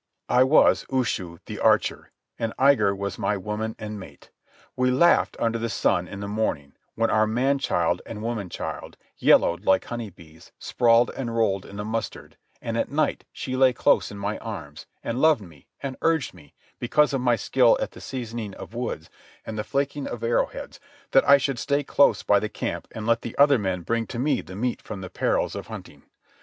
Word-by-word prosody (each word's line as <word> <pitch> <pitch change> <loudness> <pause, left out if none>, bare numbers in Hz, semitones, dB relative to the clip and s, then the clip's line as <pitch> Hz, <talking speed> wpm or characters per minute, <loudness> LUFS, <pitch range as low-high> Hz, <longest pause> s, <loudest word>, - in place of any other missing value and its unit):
I 125 - +4
was 135 +4 +4
Ushu, 105 -10 -1
the - - -7
archer, - - +2 0.3
and 115 -1 -2
Igar 130 -7 +4
was 100 0 -4
my 105 - 0
woman 105 +3 -4
and 105 -1 -6
mate. 95 - -13 0.4
We 125 0 +2
laughed 135 +7 +3
under 115 0 0
the 115 0 -2
sun - - +1
in 100 - -8
the 100 - -4
morning, 100 -10 -2 0.2
when 115 0 +1
our 110 0 +3
man 130 +5 +1
child 90 -11 0
and 105 -1 -7
woman 110 -5 -3
child, - - -6 0.2
yellowed 85 - +4
like 95 0 +3
honey 120 -3 -5
bees, 80 -3 -17
sprawled 120 0 +3
and 120 -3 -4
rolled 100 -4 +1
in 100 - -11
the 105 0 -4
mustard, 110 0 -5 0.3
and 115 0 -2
at - - -1
night 150 +1 0
she 130 - -5
lay 130 -1 +4
close - - +2
in 100 - -9
my 100 +1 -3
arms, 80 -10 -8 0.2
and 115 +3 -2
loved 155 -7 +4
me, 80 -6 -16 0.2
and 135 -2 -4
urged 160 -5 +1
me, 75 -6 -18 0.2
because 150 +5 +2
of 135 - 0
my 120 -1 +3
skill 110 - +3
at - - -3
the - - -13
seasoning 115 -5 -5
of - - -10
woods 120 -10 -4 0.4
and 110 - -5
the 105 - -2
flaking 140 +3 -2
of 120 -1 -6
arrow 115 +1 +2
heads, - - -9 0.3
that 135 - +4
I 140 - +9
should 135 -2 -2
stay 140 +5 0
close 140 +1 +3
by 100 -1 +4
the 110 - -3
camp 105 - -4
and 110 - -7
let 115 0 +2
the 120 - -7
other 140 -2 +6
men 95 -3 -2
bring 115 +5 -1
to - - -6
me 145 +5 +1
the 95 - -11
meat 120 +4 -2
from 100 - -7
the 95 - -8
perils - - 0
of - - -6
hunting. - - -10
115 Hz, 205 wpm, -25 LUFS, 100-130 Hz, 0.4 s, I